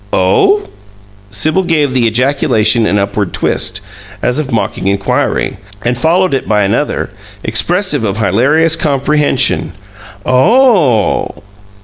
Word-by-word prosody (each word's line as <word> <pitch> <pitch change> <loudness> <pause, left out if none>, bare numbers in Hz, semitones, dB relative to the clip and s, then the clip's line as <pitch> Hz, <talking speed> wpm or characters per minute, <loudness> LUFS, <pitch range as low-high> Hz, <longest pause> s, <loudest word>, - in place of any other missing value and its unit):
"Oh?" 390 - +2 0.7
Sibyl 155 - 0
gave 155 -7 0
the 125 -3 +2
ejaculation 115 -2 +1
an 100 - +1
upward 100 -1 -2
twist, 95 - -1 0.4
as 125 +4 0
of 145 -3 -4
mocking 100 -4 -2
inquiry, 100 -1 -1 0.3
and 120 +1 0
followed 170 +6 +1
it 135 - -2
by 105 -1 +2
another, 115 +9 -1 0.3
expressive 170 - 0
of 100 -2 -2
hilarious 140 - +2
comprehension. 150 -1 0 0.5
"OH!" 155 - +2
130 Hz, 110 wpm, -12 LUFS, 105-155 Hz, 0.7 s, Oh